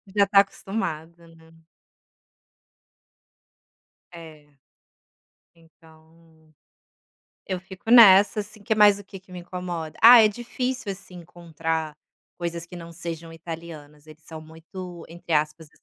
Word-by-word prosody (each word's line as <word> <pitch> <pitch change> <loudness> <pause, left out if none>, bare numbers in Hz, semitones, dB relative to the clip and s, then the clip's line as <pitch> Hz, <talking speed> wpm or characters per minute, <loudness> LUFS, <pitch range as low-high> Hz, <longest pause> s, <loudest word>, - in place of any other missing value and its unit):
Já 200 -1 +4
tá 200 0 +5
acostumado, 170 -5 -6
né. 160 0 -21 2.6
É, 160 -3 -13 1.1
então 160 -1 -24 0.9
eu 185 -2 -4
fico 190 +4 -10
nessa, 210 -3 +7
assim, 210 +1 -11
que 220 +1 -1
mais 210 -1 +5
o 205 - -12
que 195 -1 -12
que 185 0 -20
me 180 - -8
incomoda? 175 -3 -7
Ah, 235 +1 +10
é - - +6
difícil, 245 +1 -5
assim, 190 -1 -13
encontrar 165 -2 -5 0.4
coisas 170 -1 -5
que 180 - -11
não 170 0 -10
sejam 165 -1 -8
italianas, 160 -2 -11
eles 155 0 -16
são 160 -1 -10
muito, 170 +2 -11
entre 170 0 -8
aspas 150 +1 -1
170 Hz, 120 wpm, -24 LUFS, 160-195 Hz, 2.6 s, Ah